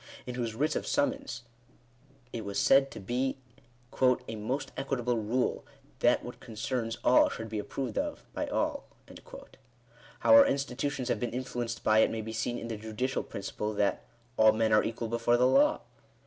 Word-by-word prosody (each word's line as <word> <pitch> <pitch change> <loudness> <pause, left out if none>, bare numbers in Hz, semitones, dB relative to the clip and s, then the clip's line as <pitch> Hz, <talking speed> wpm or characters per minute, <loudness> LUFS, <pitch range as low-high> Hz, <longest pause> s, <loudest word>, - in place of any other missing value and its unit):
in 125 - -5
whose 120 -3 -3
writs 150 +6 0
of - - -3
summons 280 - -1 0.9
it 115 - -4
was 100 -1 -4
said 135 0 +5
to - - -9
be 125 +6 -1 0.4
" 120 0 -19 0.3
a 110 - -5
most 115 +7 -3
equitable 125 -3 -1
rule, 115 +4 -1 0.4
that - - +3
what - - -8
concerns 115 +1 -3
all 125 - +5
should 115 - -6
be 110 -1 -4
approved 130 +5 -3
of 290 0 -4
by - - -2
all." - - -1 1.4
How - - +5
our 280 0 +9
institutions 140 -1 -2
have - - 0
been 120 - -2
influenced 120 -2 -4
by 110 0 +4
it - - +5
may 110 - -3
be 110 +1 -6
seen 120 +2 -2
in 115 - -6
the 115 -2 -4
judicial 110 +5 -2
principle 105 +2 -5
that 100 -1 0 0.2
" 120 +1 -35
all 110 0 +6
men 110 0 +1
are 105 - +5
equal 115 0 -3
before 115 +1 +2
the 125 - +4
law." 290 - +4
120 Hz, 180 wpm, -30 LUFS, 110-130 Hz, 1.4 s, our